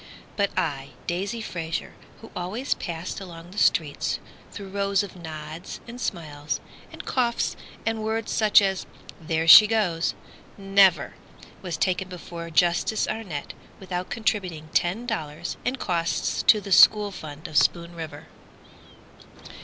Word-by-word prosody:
But 200 -1 +1
I—Daisy 175 - -3
Fraser 165 -5 -4 0.3
who 225 - -12
always 200 +10 -2
passed 170 0 -5
Along 175 -2 -10
the 205 - -4
street - - +2 0.3
through 200 -2 -8
rows 200 0 +1
of 200 - -9
nods 160 -1 -8
and 240 +1 -9
smiles, 150 -5 -3 0.3
And - - -9
coughs 240 -2 0 0.3
and 225 -1 -1
words 220 0 -2
such 210 -1 +5
as 190 -1 -1 0.3
"there 160 0 -1
she 210 +6 +11
goes." 195 -7 0 0.4
Never 195 -5 +4 0.5
was 175 -4 -4
taken 185 +2 0
before 170 -2 -8
Justice 175 +6 +2
Arnett 200 -10 -5 0.3
Without 180 -1 -4
contributing 185 -9 -2
ten 190 +8 +1
dollars 155 -11 -4
and 255 +2 -1
costs 170 -7 -1
To 215 - +7
the 200 -1 -8
school 210 +2 +7
fund 155 -2 -8
of 155 - -11
Spoon 170 +2 +2
River! 165 -2 -8
180 Hz, 130 wpm, -25 LUFS, 165-210 Hz, 0.5 s, she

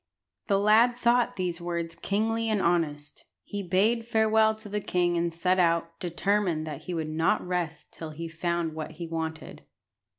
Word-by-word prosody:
The 200 -3 +3
lad 220 +4 +4
thought 245 0 +2
these 180 -2 -2
words 170 -1 -3
kingly 225 +5 -1
and 215 -2 +1
honest. 160 -5 -1 0.2
He 205 -1 -5
bade 200 +6 +2
farewell 220 -1 +3
to 215 0 -12
the 210 +1 -2
king 175 -2 +1
and 170 0 0
set 180 +3 +1
out, 165 -1 +1
determined 180 -2 0
that 150 -3 -7
he 180 - -4
would 160 -2 -2
not 160 +1 +1
rest 175 -3 -3
till 160 - -7
he 165 +2 -6
had 165 - -14
found 170 -1 -1
what 155 0 -6
he 170 +2 -6
wanted. 160 -1 -5
175 Hz, 175 wpm, -27 LUFS, 165-210 Hz, 0.2 s, lad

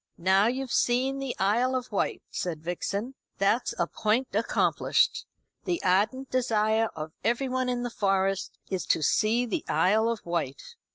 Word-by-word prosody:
"Now, 190 +4 +3
you've 255 +1 -2
seen 260 +3 +1
the 270 -2 -3
Isle 235 +7 +2
of 250 -2 -3
Wight," 200 - -1
said 160 -4 -4
Vixen. 200 +8 -3 0.2
"That's 210 +5 +1
a - - +2
point 225 +4 0
accomplished. 220 +3 +1 0.4
The 345 -2 0
ardent 210 +9 +1
desire 225 -3 +2
of 155 0 -6
everyone 255 +2 0
in 245 -1 -1
the 245 - -3
Forest 195 -2 0
is 190 -2 -2
to 160 - +2
see 225 - +2
the 310 +7 -2
Isle 220 +4 +3
of 230 -2 -4
Wight. 170 - -3
225 Hz, 155 wpm, -27 LUFS, 195-250 Hz, 0.4 s, Now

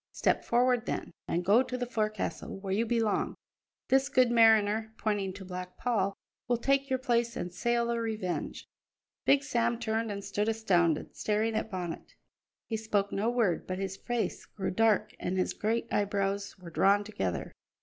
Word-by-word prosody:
Step - - +1
forward, 245 0 +2
then, - - -3
and 175 +1 -1
go 210 +6 +6
to 255 -1 -3
the 250 - -2
fo'castle 215 -4 -3
where 195 -1 -3
you 225 +4 +1
belong; 225 -2 +1 0.5
this 270 +1 +3
good 255 -4 +4
mariner," 220 -1 +4
pointing 205 -3 -1
to 190 +1 -9
Black 180 0 -7
Paul, 200 -5 0 0.3
"will 240 0 +2
take 275 +3 +1
your 260 - +2
place 235 -2 0
and 175 0 -4
sail 235 +4 +1
the 235 0 -1
Revenge." 220 -6 -3 0.6
Big 280 0 +5
Sam 235 -4 +1
turned 225 -1 -1
and 200 0 -5
stood 205 +2 0
astounded, 175 -8 +1
staring 215 +1 0
at 220 - -1
Bonnet. 180 -4 -5 0.5
He 225 - -2
spoke 210 -2 0
no 210 +4 0
word, 230 -8 +1
but 185 - -3
his 195 0 -3
face 240 +3 -3
grew 190 -2 -3
dark 220 0 +2
and 185 +1 -2
his 185 - 0
great 225 +2 0
eyebrows 200 -1 0
were 180 -2 -11
drawn 200 +5 +4
together. 95 - -3
220 Hz, 170 wpm, -30 LUFS, 195-235 Hz, 0.6 s, go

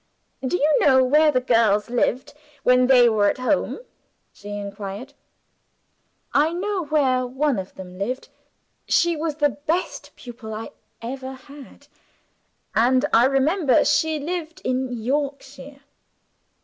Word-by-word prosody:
"Do 260 +7 0
you 300 -1 +2
know 260 -2 +5
where 300 +4 +4
the 255 - +2
girls 230 -3 +2
lived 255 +3 -1 0.3
when 250 0 +4
they 250 -2 +6
were 210 -3 +3
at - - -2
home?" 280 - -1 0.5
she 205 - -12
inquired. 200 +5 -7 1.2
"I 305 +3 +3
know 380 0 -2
where 265 -4 +1
one 265 -2 0
of 185 - -8
them 185 -1 -10
lived. 250 +6 -4 0.6
She 345 -1 +2
was 310 -1 -3
the 295 -1 +2 0.2
best 345 +4 -2
pupil 230 -3 -9
I 225 +1 -7 0.3
ever 260 +2 -6
had 280 +1 -14 0.9
and 255 +4 +3
I 230 +2 +6
remember 275 +3 +2
she 315 -1 +1
lived 330 +3 -5
in 255 0 -1
Yorkshire." 275 +3 -4
265 Hz, 130 wpm, -22 LUFS, 240-295 Hz, 1.2 s, they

